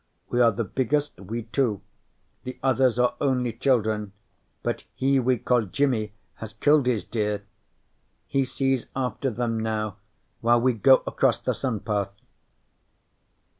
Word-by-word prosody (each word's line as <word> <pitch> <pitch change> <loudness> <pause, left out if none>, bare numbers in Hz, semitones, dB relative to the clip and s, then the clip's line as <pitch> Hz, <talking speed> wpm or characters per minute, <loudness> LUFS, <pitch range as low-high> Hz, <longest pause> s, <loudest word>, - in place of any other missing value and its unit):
We 120 - +1
are 115 -1 +6
the 115 +2 -2
biggest, 145 +7 -1
we 110 +5 -5
two. 115 -3 0 0.6
The 130 - -7
others 130 -2 +3
are 125 0 +3
only 125 -4 +1
children, 110 -5 0 0.5
but - - -2
he 135 +1 +2
we 130 0 +2
call 125 +2 +2
Jimi 110 -1 0 0.2
has 110 0 -8
killed 145 +3 +3
his 120 -5 +1
deer. 105 -2 -2 0.8
He 135 - +1
sees 135 -1 -1
after 130 0 -1
them 115 -1 -2
now 110 -2 -2 0.4
while 120 +1 +4
we 125 +1 +2
go 130 +4 +5
across - - +1
the - - -1
sun 120 -6 -3
path." 100 -3 -1
120 Hz, 140 wpm, -25 LUFS, 110-130 Hz, 0.8 s, are